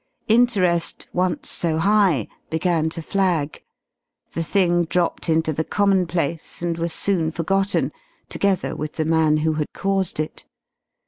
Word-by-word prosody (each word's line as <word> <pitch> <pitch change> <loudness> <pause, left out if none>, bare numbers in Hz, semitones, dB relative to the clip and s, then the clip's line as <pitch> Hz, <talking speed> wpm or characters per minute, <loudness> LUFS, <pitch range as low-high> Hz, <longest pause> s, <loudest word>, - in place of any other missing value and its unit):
Interest, 205 -8 +2
once 180 0 0
so 165 -2 0
high, 185 - +3 0.2
began 160 -1 +1
to 165 0 -7
flag. 175 -6 0 0.7
The 165 - -2
thing 175 0 +2
dropped 170 +1 -1
into 160 0 +2
the 160 - -1
commonplace, 180 -5 0
and 170 -1 0
was 170 0 -2
soon 170 -3 0
forgotten, 170 -3 0 0.4
together 195 -3 0
with 155 0 -5
the 155 - -1
man 160 -1 +3
who 160 - +2
had 150 -1 -1
caused 195 -4 -1
it. 155 - -4
170 Hz, 135 wpm, -22 LUFS, 160-190 Hz, 0.7 s, high